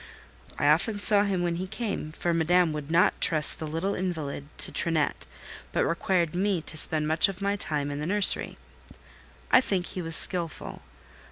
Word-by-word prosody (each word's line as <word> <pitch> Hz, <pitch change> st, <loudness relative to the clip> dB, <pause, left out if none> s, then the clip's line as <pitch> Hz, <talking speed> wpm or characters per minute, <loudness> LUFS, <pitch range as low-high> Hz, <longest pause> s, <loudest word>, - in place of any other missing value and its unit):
I -, -, -2 dB
often 165 Hz, +9 st, +2 dB
saw 205 Hz, 0 st, +4 dB
him 190 Hz, -3 st, -2 dB
when 170 Hz, -1 st, -2 dB
he 185 Hz, +2 st, -5 dB
came; 200 Hz, -7 st, -5 dB
for 170 Hz, +2 st, -2 dB
Madame 165 Hz, 0 st, +2 dB
would 150 Hz, -1 st, -7 dB
not 170 Hz, +2 st, +2 dB
trust 155 Hz, -2 st, +4 dB
the 155 Hz, -, -5 dB
little 165 Hz, +6 st, -3 dB
invalid 160 Hz, -7 st, -5 dB
to -, -, +6 dB
Trinette, 160 Hz, -, -1 dB, 0.4 s
but -, -, 0 dB
required 170 Hz, -1 st, -1 dB
me 190 Hz, 0 st, 0 dB
to 155 Hz, -, 0 dB
spend 155 Hz, 0 st, +1 dB
much 160 Hz, +4 st, +2 dB
of 190 Hz, -2 st, -8 dB
my 200 Hz, 0 st, -1 dB
time 150 Hz, -7 st, -2 dB
in 145 Hz, -, -5 dB
the 150 Hz, -, -4 dB
nursery. 205 Hz, +1 st, +2 dB, 0.9 s
I 255 Hz, -, +6 dB
think 190 Hz, -7 st, -2 dB
he 185 Hz, -, -6 dB
was 165 Hz, -1 st, +2 dB
skilful. 170 Hz, -3 st, -2 dB
170 Hz, 180 wpm, -26 LUFS, 155-190 Hz, 0.9 s, to